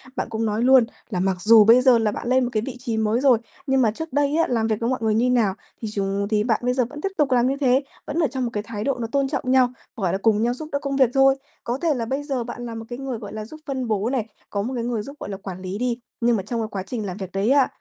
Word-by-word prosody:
Bạn -, -, -2 dB
cũng 225 Hz, 0 st, -2 dB
nói 215 Hz, +1 st, 0 dB
luôn 260 Hz, -1 st, +6 dB, 0.2 s
là 185 Hz, -6 st, -2 dB
mặc 190 Hz, 0 st, +1 dB
dù 220 Hz, +2 st, +7 dB
bây 235 Hz, +3 st, +7 dB
giờ 255 Hz, -2 st, +6 dB
là 215 Hz, -2 st, +1 dB
bạn 235 Hz, -, -6 dB
lên 255 Hz, +1 st, +3 dB
một 245 Hz, -, -1 dB
cái 215 Hz, -1 st, 0 dB
vị 270 Hz, -, -6 dB
trí 235 Hz, -3 st, -3 dB
mới 220 Hz, +1 st, +1 dB
rồi, 260 Hz, -3 st, +5 dB, 0.3 s
nhưng 265 Hz, -1 st, +3 dB
mà 220 Hz, -, +3 dB
trước 320 Hz, +7 st, -7 dB
đây 290 Hz, +1 st, +2 dB
á, 330 Hz, -, +3 dB
làm 225 Hz, -2 st, +1 dB
việc 215 Hz, -1 st, 0 dB
với 230 Hz, -, 0 dB
mọi 260 Hz, -, 0 dB
người 220 Hz, -1 st, +2 dB
như 240 Hz, +3 st, +2 dB
nào 230 Hz, -6 st, +2 dB, 0.3 s
thì 220 Hz, -, -3 dB
chúng 200 Hz, 0 st, -1 dB
thì 210 Hz, -1 st, +2 dB
bạn 225 Hz, -2 st, +1 dB
bây 250 Hz, 0 st, +1 dB
giờ 250 Hz, -1 st, +1 dB
vẫn 295 Hz, +5 st, -9 dB
tiếp 390 Hz, -, -1 dB
tục 285 Hz, -3 st, +2 dB
làm 245 Hz, 0 st, +4 dB
như 270 Hz, +1 st, 0 dB
thế, 260 Hz, +1 st, +3 dB, 0.2 s
vẫn 300 Hz, +2 st, -2 dB
ở 320 Hz, -, +3 dB
trong 260 Hz, -2 st, -2 dB
một -, -, -1 dB
cái 210 Hz, -, -2 dB
thái 215 Hz, -2 st, -5 dB
độ 275 Hz, +2 st, 0 dB
nó 230 Hz, -, -2 dB
tôn 275 Hz, -1 st, +1 dB
trọng 265 Hz, -2 st, -2 dB
nhau, 260 Hz, -1 st, +5 dB, 0.3 s
gọi 190 Hz, -5 st, -1 dB
là, -, -, +1 dB
cùng 215 Hz, -1 st, +3 dB
nhau 240 Hz, -, +2 dB
giúp 305 Hz, +5 st, -8 dB
đỡ 280 Hz, -, 0 dB
công 280 Hz, -1 st, -3 dB
việc 260 Hz, -3 st, +5 dB
thôi. 270 Hz, 0 st, +5 dB, 0.3 s
Có 240 Hz, +2 st, -2 dB
thể 325 Hz, -3 st, +2 dB
là 235 Hz, -3 st, -2 dB
bây 270 Hz, +5 st, -2 dB
giờ 270 Hz, -5 st, -2 dB
bạn 240 Hz, 0 st, -7 dB
là 230 Hz, -1 st, -6 dB
một 225 Hz, 0 st, -7 dB
cái 240 Hz, +1 st, -6 dB
người, 270 Hz, -3 st, -4 dB
gọi 205 Hz, -2 st, -8 dB
là, 215 Hz, 0 st, -5 dB
giúp 310 Hz, +8 st, -11 dB
phân 260 Hz, -4 st, -3 dB
bố 215 Hz, +1 st, 0 dB
này, 250 Hz, -4 st, -1 dB, 0.2 s
có 200 Hz, -, -2 dB
một 240 Hz, +6 st, -3 dB
cái 240 Hz, -2 st, -2 dB
người 235 Hz, -2 st, -1 dB
giúp, 280 Hz, +6 st, -9 dB
gọi -, -, -6 dB
là, 195 Hz, -, -4 dB
quản 190 Hz, -2 st, -8 dB
lý 185 Hz, +1 st, -4 dB
đi, 245 Hz, 0 st, -1 dB, 0.2 s
nhưng 235 Hz, 0 st, +3 dB
mà 195 Hz, -, -2 dB
trong 230 Hz, +3 st, -3 dB
cái 220 Hz, -, -2 dB
quá 190 Hz, -2 st, -3 dB
trình 215 Hz, +2 st, -4 dB
làm 185 Hz, -1 st, -5 dB
việc 190 Hz, -3 st, -6 dB
đấy 195 Hz, +3 st, 0 dB
á, 275 Hz, -2 st, +5 dB
235 Hz, 330 wpm, -23 LUFS, 215-265 Hz, 0.3 s, dù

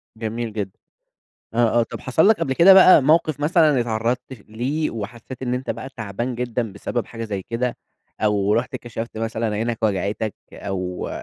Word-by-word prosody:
جميل 115 Hz, 0 st, -4 dB
جدًا. 100 Hz, -3 st, -3 dB, 0.8 s
آه، 120 Hz, 0 st, +3 dB
آه. -, -, +3 dB
طب 115 Hz, -, -6 dB
حصل 160 Hz, +9 st, +3 dB
لك 220 Hz, -, +4 dB
قبل 135 Hz, -, 0 dB
كده 170 Hz, +8 st, +7 dB
بقى 185 Hz, -5 st, +8 dB
موقف 155 Hz, +1 st, +2 dB
مثلًا 150 Hz, -3 st, +4 dB
اتعرّضت 120 Hz, +3 st, -2 dB
ف 120 Hz, -, -17 dB
ليه 130 Hz, +8 st, -2 dB
وحسّيت 115 Hz, +4 st, -7 dB
إن 125 Hz, -1 st, -1 dB
أنت 125 Hz, +1 st, -3 dB
بقى 130 Hz, -, -5 dB
تعبان 115 Hz, +3 st, -3 dB
جدًا 120 Hz, -2 st, -3 dB
بسبب 115 Hz, +4 st, -3 dB
حاجة 115 Hz, -1 st, -6 dB
زي 100 Hz, -3 st, -4 dB
كده، 120 Hz, +4 st, -2 dB, 0.4 s
أو 105 Hz, -1 st, +2 dB
رُحت 120 Hz, +3 st, -1 dB
كشفت 115 Hz, -2 st, -7 dB
مثلًا 115 Hz, 0 st, -2 dB
عينك 115 Hz, +1 st, -2 dB
وجعتك 105 Hz, 0 st, -1 dB, 0.2 s
أو 90 Hz, -2 st, -4 dB
115 Hz, 170 wpm, -22 LUFS, 110-130 Hz, 0.8 s, بقى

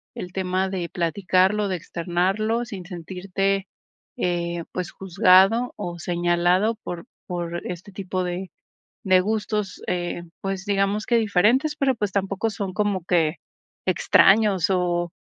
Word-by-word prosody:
el 180 Hz, 0 st, -7 dB
tema 190 Hz, 0 st, 0 dB
de 180 Hz, -3 st, -3 dB
platicarlo, 185 Hz, +3 st, +1 dB
de 185 Hz, -, -1 dB
externarlo 190 Hz, +8 st, -1 dB
sin 195 Hz, -5 st, -8 dB
sentirte, 190 Hz, +2 st, -2 dB, 0.5 s
eh, 170 Hz, -1 st, -1 dB
pues, 180 Hz, -2 st, -3 dB
juzgado 190 Hz, +5 st, +4 dB
o 175 Hz, -4 st, -5 dB
señalado 175 Hz, +5 st, +2 dB
por 175 Hz, -1 st, -6 dB, 0.2 s
por 175 Hz, -1 st, -4 dB
este 180 Hz, +3 st, -7 dB
tipo 185 Hz, -1 st, -3 dB
de 180 Hz, +1 st, -4 dB, 0.5 s
de 185 Hz, -1 st, +5 dB
gustos, 210 Hz, -1 st, -2 dB
eh, 175 Hz, -1 st, -2 dB, 0.2 s
pues, 195 Hz, 0 st, -3 dB
digamos 200 Hz, +1 st, +1 dB
que 235 Hz, -, +3 dB
diferentes, 230 Hz, -, +3 dB
pero, 275 Hz, -3 st, +2 dB
pues, 210 Hz, -3 st, -2 dB
tampoco 195 Hz, +2 st, 0 dB
son 200 Hz, -2 st, -4 dB
como 205 Hz, -3 st, 0 dB
que 170 Hz, -3 st, +2 dB, 0.5 s
extraños, 195 Hz, +1 st, +4 dB
o 175 Hz, -2 st, 0 dB
190 Hz, 130 wpm, -24 LUFS, 175-205 Hz, 0.5 s, de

